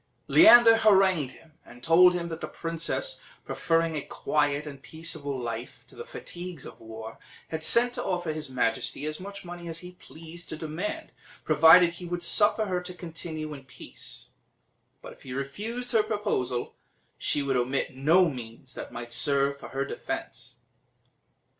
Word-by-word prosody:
Leander 240 -9 +8
harangued 190 - +3
him, 160 -1 -21
and 120 +1 -16
told 180 +3 +6
him 170 -1 -3
that 160 -1 -6
the - - -3
princess, 165 - -3 0.2
preferring 165 -1 0
a 150 - -2
quiet 145 +1 -1
and 140 -2 -9
peaceable 160 -3 -4
life 120 0 -6
to - - -19
the 465 - -7
fatigues 180 - -8
of - - -11
war, 110 0 -9 0.3
had 160 0 -4
sent 240 +8 +7
to - - -4
offer 175 -4 -2
his 155 -3 -6
majesty 130 +2 -1
as 155 0 -4
much 200 0 -9
money 175 0 -8
as 165 0 -4
he 180 0 -9
pleased 165 -1 -12
to 155 - -5
demand, 175 - -5 0.3
provided 170 +2 +7
he 175 +1 -9
would 175 0 -4
suffer 215 +4 +3
her 180 -3 -2
to 180 0 -8
continue 160 -3 -6
in 140 -2 -10
peace; - - -10 0.7
but - - -9
if - - -23
he 130 - -8
refused 215 - -4
her 225 -3 +4
proposal, 165 - -2 0.5
she 145 - 0
would 135 -1 0
omit 130 +2 -1
no 165 +7 +4
means 125 -2 -8
that - - -8
might 120 0 -7
serve 140 +1 +1
for - - -10
her 135 +1 -2
defence. - - -6
165 Hz, 165 wpm, -27 LUFS, 140-180 Hz, 0.7 s, Leander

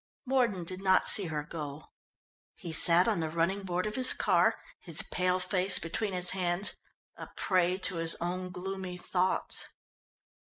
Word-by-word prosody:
Mordon 245 -8 +1
did 185 +2 -6
not 190 -1 +3
see 200 - +7
her 155 -3 -3
go. 150 -1 -8 0.6
He 175 -4 -7
sat 170 +4 +3
on 215 -6 +1
the 160 -1 -2
running 170 +5 -1
board 180 -1 -2
of 210 - -3
his 260 +1 +3
car, - - +2 0.2
his - - -1
pale 180 0 0
face 185 0 +3
between 195 +5 -2
his 180 -1 +1
hands, 180 +1 -1 0.4
a - - -8
prey 185 -1 +1
to 190 -2 0
his 165 0 +3
own 180 +2 -4
gloomy 185 0 -6
thoughts. 180 +1 -1
180 Hz, 160 wpm, -30 LUFS, 170-195 Hz, 0.6 s, see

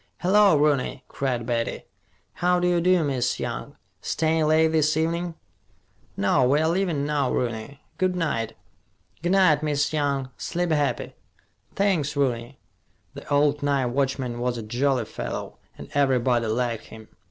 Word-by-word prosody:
"Hello, 195 -2 +5
Rooney," 145 -3 +1
cried 125 -4 -2
Betty. 115 -1 -2 0.5
"How 180 0 +1
d'ye 175 -1 +2
do, 180 0 +3
Miss 130 -4 -1
Young! - - -5 0.3
Stayin' 160 -1 +1
late 160 +1 +4
this 155 -1 +2
evenin'?" 170 +1 -1 0.8
"No, 100 +7 +3
we're 150 +3 +3
leaving 170 -4 0
now, 145 -3 0
Rooney. 120 +3 -3 0.2
Good 185 -1 +1
night." 115 -10 -2 0.6
"G' 175 - -1
night, 185 -6 +4
Miss 150 0 0
Young. 140 -3 -1
Sleep 175 -1 -2
happy." 145 -2 0 0.6
"Thanks, 175 -8 +1
Rooney." 125 -2 -1 0.6
The - - -11
old 145 0 +3
night 140 -2 +1
watchman 130 -2 -1
was 120 0 -1
a 115 - -5
jolly 125 +2 0
fellow, - - -6 0.2
and - - -9
everybody 125 -4 +2
liked 115 0 -1
him. 110 -1 -12
145 Hz, 140 wpm, -25 LUFS, 125-160 Hz, 0.8 s, Hello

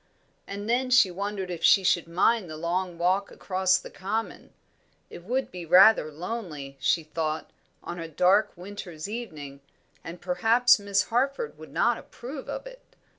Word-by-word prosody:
And 200 +1 -6
then 250 +2 +1
she 250 -7 +5
wondered 195 0 -4
if 170 - -6
she 195 - +6
should 175 -3 +2
mind 185 +3 +1
the 155 - -7
long 175 +2 -2
walk 185 +4 +1
across 185 -1 +1
the - - -10
common; 215 +4 -4 0.6
it 175 - -10
would 255 +7 -2
be 180 -1 -7
rather 180 -1 +6
lonely, 155 -5 -6
she 165 - +1
thought, 155 0 -3 0.3
on 175 - -6
a 165 - -5
dark 185 +6 +3
winter's 180 -3 -8
evening, 155 -12 -7 0.4
and 170 +2 -8
perhaps 225 +8 +3
Miss 200 -1 +1
Harford 275 - -1
would - - -11
not - - +1
approve 265 +3 -9
of - - -5
it. - - -11
185 Hz, 160 wpm, -26 LUFS, 170-225 Hz, 0.6 s, she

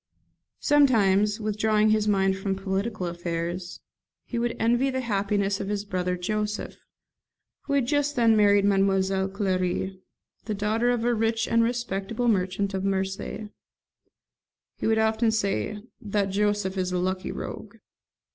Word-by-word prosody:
] - - -56
Sometimes, 210 -7 +4
withdrawing 215 0 +2
his 215 -1 +2
mind 195 -2 +2
from 195 0 -2
political 195 +1 -2
affairs, 175 +1 -4 0.4
he 235 - -3
would 235 0 -1
envy 240 +4 +2
the 260 0 -2
happiness 200 -3 0
of 195 - -4
his 205 0 -2
brother 180 -2 -2
Joseph, 210 +3 -3 0.9
who 280 - -2
had 275 -3 +2
just 290 +2 0
then 230 -3 +4
married 205 -1 +4
Mademoiselle 195 -1 +2
Clary, 190 -1 -1 0.4
the 215 - -2
daughter 215 +4 +1
of 240 -2 0
a 240 - +3
rich 225 0 0
and 230 0 +3
respectable 230 -1 -2
merchant 195 -1 0
of 190 0 -2
Marseilles. 195 +2 -2 1.3
He - - -3
would 220 0 +3
often 220 +1 +2
say, 210 - -1 0.2
"That 200 -2 -1
Joseph 205 -1 0
is 185 0 -1
a 180 - 0
lucky 185 +1 -2
rogue." - - -7
205 Hz, 145 wpm, -26 LUFS, 190-225 Hz, 1.3 s, Sometimes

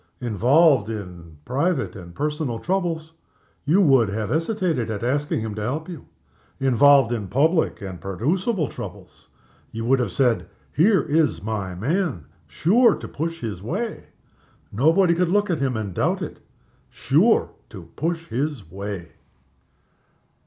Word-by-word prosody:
Involved 125 - +3
in 90 -7 -8
private 135 - -1
and 85 -3 -11
personal 150 -4 -2
troubles, 165 0 -2 0.5
you 170 +8 +4
would 135 - +4
have 105 +1 -3
hesitated 165 - 0
at 110 0 -4
asking 140 0 0
him 110 -1 -4
to 105 - -5
help 145 +9 -3
you. 170 -7 -9 0.5
Involved 135 -1 +5
in 110 -5 -2
public 155 - +1
and 95 -3 -7
producible 155 - -1
troubles, - - -10 0.4
you 115 0 -5
would 130 +2 +3
have 120 -6 -1
said, 125 +1 +1 0.3
Here 190 +5 +4
is 150 - +1
my 100 -4 -3
man. 145 - -1 0.2
Sure 225 +6 +3
to - - -8
push 165 +2 -4
his 105 -6 -5
way 205 - -4 0.7
nobody 165 - +3
could 175 0 +1
look 205 +1 +2
at 165 - -1
him 130 -4 0
and 100 -4 -4
doubt - - 0
it - - -7 0.5
sure - - +2 0.2
to - - -12
push 165 +1 -3
his 130 - -3
way. 100 -3 -6
135 Hz, 140 wpm, -23 LUFS, 110-165 Hz, 0.7 s, Involved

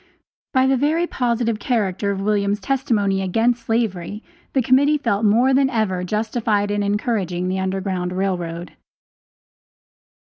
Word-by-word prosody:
By 260 0 +3
the 265 0 +3
very 310 +6 +1
positive 235 -6 -1
character 205 -5 -1
of 195 -1 -2
William's 205 0 0
testimony 205 -5 0
against 230 +5 0
slavery, 210 -3 -2 0.3
the 265 - +3
Committee 280 +5 +4
felt 230 -7 -1
more 240 +6 +4
than 270 0 +3
ever 210 -7 -1
justified 215 +1 -1
in 205 0 0
encouraging 200 -4 -1
the 190 +1 -1
Underground 190 -1 -2
Rail 190 +1 0
Road. 170 -1 -6
210 Hz, 135 wpm, -21 LUFS, 190-240 Hz, 0.3 s, Committee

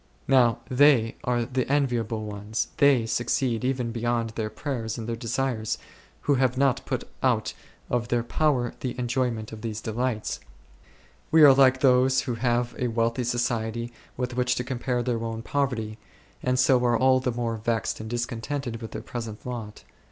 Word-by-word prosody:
Now 125 -4 +4
they 130 -4 +4
are 120 -1 +1
the 130 +1 -2
enviable 120 -6 0
ones, 105 +2 -3
they 140 -5 +5
succeed 120 +1 0
even 125 -2 -1
beyond 115 -1 -1
their 110 -1 -3
prayers 115 -4 -4
and 115 -1 -5
their 115 - -2
desires, 115 -1 -2 0.4
who 145 - +2
have 130 -1 +2
not 135 -1 +2
put - - -2 0.2
out - - +1 0.3
of 120 -1 -1
their 120 -1 +1
power 125 -2 +1
the 125 -2 -4
enjoyment 120 -3 -1
of 110 -1 -8
these 110 -2 -4
delights. 115 0 -2 0.9
We 160 -1 +6
are 140 -2 +10
like 130 -1 +5
those 130 0 +4
who 130 -3 -3
have 120 0 0
a 125 - +1
wealthy 115 +1 0
society 120 -1 -1 0.2
with 125 -1 -3
which 125 0 +1
to 125 - -2
compare 125 -1 -2
their 115 -2 -1
own 115 0 -4
poverty, 115 -7 -2 0.4
and 125 0 +1
so 125 0 +4
are 120 -1 +3
all 130 0 +4
the 130 -1 -1
more 115 -1 -2
vexed 115 0 -1
and 110 0 -6
discontented 120 +1 -3
with 115 - -7
their - - -5
present 115 -3 -6
lot. 115 -4 -6
120 Hz, 170 wpm, -26 LUFS, 115-130 Hz, 0.9 s, are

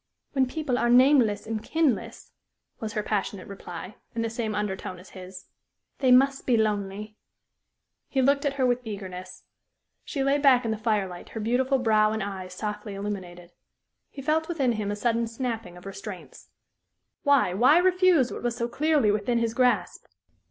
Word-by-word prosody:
"When 265 -2 +2
people 270 -3 -2
are 240 - +1
nameless 245 -4 +5
and 220 -1 -3
kinless," 240 - -1 0.5
was 215 -2 -5
her 210 - -1
passionate 200 -2 -3
reply, 185 0 -8 0.2
in 230 - -1
the 225 - -2
same 225 -2 -3
undertone 195 -2 -3
as 180 +2 -15
his, 185 0 -10 0.5
"they 260 -2 +3
must 270 +2 +4
be 245 -3 +4
lonely." 210 -1 -2 0.9
He 270 - -1
looked 280 +2 +3
at 285 -2 0
her 265 -2 +1
with 245 0 +2
eagerness. 185 -4 -8 0.6
She 275 -3 -3
lay 275 +1 +2
back 260 -4 +5
in 225 - 0
the 220 - -2
firelight, 205 -5 -2
her 225 - -6
beautiful 250 +5 +1
brow 215 -3 +3
and 220 -2 -2
eyes 190 -2 -6
softly 210 0 -5
illuminated. 180 -4 -6 0.6
He 275 - -9
felt 315 +3 +1
within 280 -8 0
him 215 -3 -2
a 205 - -1
sudden 230 +1 0
snapping 225 -6 -5
of 180 - -14
restraints. 195 -1 -9 0.7
Why 280 - +3
why 255 - +5
refuse 365 -6 +3
what - - -6
was 240 -1 -1
so 235 -1 -1
clearly 285 -3 +2
within 215 +3 0
his 230 -1 0
grasp? 250 0 +1
225 Hz, 170 wpm, -26 LUFS, 200-260 Hz, 0.9 s, nameless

